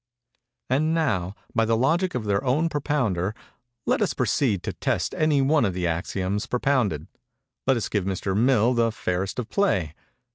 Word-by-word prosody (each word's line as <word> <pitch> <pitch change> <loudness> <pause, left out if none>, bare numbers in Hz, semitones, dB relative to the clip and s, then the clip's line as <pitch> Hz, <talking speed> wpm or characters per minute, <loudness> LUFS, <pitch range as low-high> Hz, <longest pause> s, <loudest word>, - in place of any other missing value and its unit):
"And 155 +5 +1
now, 100 - 0 0.2
by 115 - +2
the 115 0 +2
logic 170 +9 +1
of 115 - -2
their 100 +2 +1
own 145 +6 +1
propounder, 125 - -1 0.5
let - - +1
us - - +1
proceed 110 -10 +1
to - - -3
test - - -1
any 150 -3 +2
one 145 0 +3
of 95 -5 0
the 90 -1 -1
axioms 95 +4 -2
propounded. 120 - 0 0.6
Let 135 -2 +4
us 115 - -2
give 100 -3 -1
Mr. 95 0 -2
Mill 120 +1 +3
the 115 -1 +2
fairest 95 -2 -2
of 125 -3 -3
play. 95 - +1
115 Hz, 170 wpm, -25 LUFS, 95-140 Hz, 0.6 s, Let